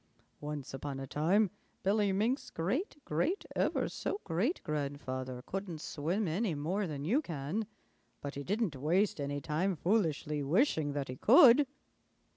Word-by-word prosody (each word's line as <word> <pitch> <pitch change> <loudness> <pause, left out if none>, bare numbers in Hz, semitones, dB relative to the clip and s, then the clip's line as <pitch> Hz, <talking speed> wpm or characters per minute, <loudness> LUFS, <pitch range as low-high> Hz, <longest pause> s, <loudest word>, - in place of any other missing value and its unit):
Once 145 -3 -5
upon 135 0 -4
a 135 - -4
time 180 +9 +2 0.3
Billy 200 +1 +3
Mink's 220 +8 0
great 250 - -2
great 170 - 0
ever - - +1
so 400 - -3
great 195 - 0
grandfather 130 -4 -3
couldn't 190 -4 -4
swim 170 +8 -1
any 180 +2 0
more 180 +7 -1
than 145 -2 -5
you 245 - +3
can, 170 - -3 0.5
but 140 - -5
he 140 - -5
didn't 205 -2 0
waste 165 +6 +1
any 140 0 -2
time 165 +7 0
foolishly 160 -5 0
wishing 155 - +2
that 140 -1 -2
he 130 - -6
could." 260 - +7
165 Hz, 145 wpm, -33 LUFS, 145-205 Hz, 0.5 s, could